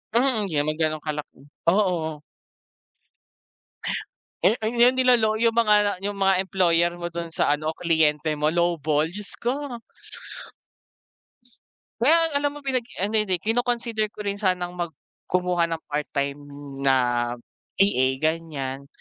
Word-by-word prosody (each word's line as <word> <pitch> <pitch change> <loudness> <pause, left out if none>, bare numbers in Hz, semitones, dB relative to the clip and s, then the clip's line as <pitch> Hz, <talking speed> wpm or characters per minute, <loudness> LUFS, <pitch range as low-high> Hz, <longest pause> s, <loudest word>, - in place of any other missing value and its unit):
Mm, 235 -5 +2
Di 170 - -7
naman 150 +1 +1
ganun 155 -1 0
kalaki, 150 -3 -6 0.2
oo. 170 -5 +1 2.2
Eh - - +6
ayung 235 +3 +4
nilolow 245 -4 +3
yung 230 0 +2
mga 210 -3 +4
yung 205 - -1
mga 195 -1 +4
employer 175 -3 +2
mo 175 0 -5
dun 170 -1 -6
sa - - +2
ano 155 +1 -3
kliyente 155 -2 +1
mo 150 +2 +1
lowball. 160 -3 +1
Diyos 205 +2 -4
ko. 250 -1 -3 2.2
Well, 325 +5 +5
alam 290 0 0
mo 290 - -10
pinag 260 -4 -1 0.2
ano 215 +2 +1
hindi 190 -5 0
kino-consider 230 -1 -1
ko 210 - -8
rin 200 0 -2
sanang 185 -3 0
mag 170 -3 -3 0.3
kumuha 180 -1 +1
ng 165 -1 -4
part 150 0 -1
time 140 0 -1 0.5
na 135 - +5 0.8
VA 195 -10 +3 0.2
ganyan. 145 -4 -2
180 Hz, 130 wpm, -24 LUFS, 160-220 Hz, 2.2 s, Eh